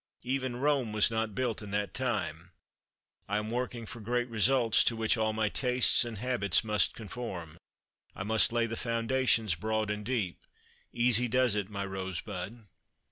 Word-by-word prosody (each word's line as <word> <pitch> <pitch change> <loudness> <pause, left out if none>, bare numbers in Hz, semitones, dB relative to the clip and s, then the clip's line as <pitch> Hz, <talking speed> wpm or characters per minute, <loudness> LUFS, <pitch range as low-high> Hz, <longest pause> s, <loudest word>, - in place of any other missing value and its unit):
Even 130 -1 -2
Rome 135 -4 0
was 110 +1 +4
not 110 -2 -2
built 120 -3 -1
in 105 - -8
that 105 0 -2
time. 95 -9 -3 0.8
I 105 - +1
am 105 +1 -3
working 120 -1 -3
for 120 +2 -9
great 120 +3 -1
results, 115 +1 +4
to 115 - +2
which 110 +1 +1
all 110 -1 0
my 110 0 0
tastes 125 +4 +3
and 120 -2 -6
habits 105 -6 +1
must 105 -1 +1
conform. 95 -8 -7 0.6
I - - -4
must 110 +2 +2
lay 120 0 +1
the 115 0 -4
foundations 115 -3 +1
broad 110 +4 -1
and 105 0 -4
deep. 105 -6 -2 0.5
Easy 125 0 +4
does 125 -1 +2
it, 105 -2 -2
my 100 -1 -4
rose 95 -2 -4
bud." 105 +3 -7
110 Hz, 170 wpm, -30 LUFS, 105-120 Hz, 0.8 s, was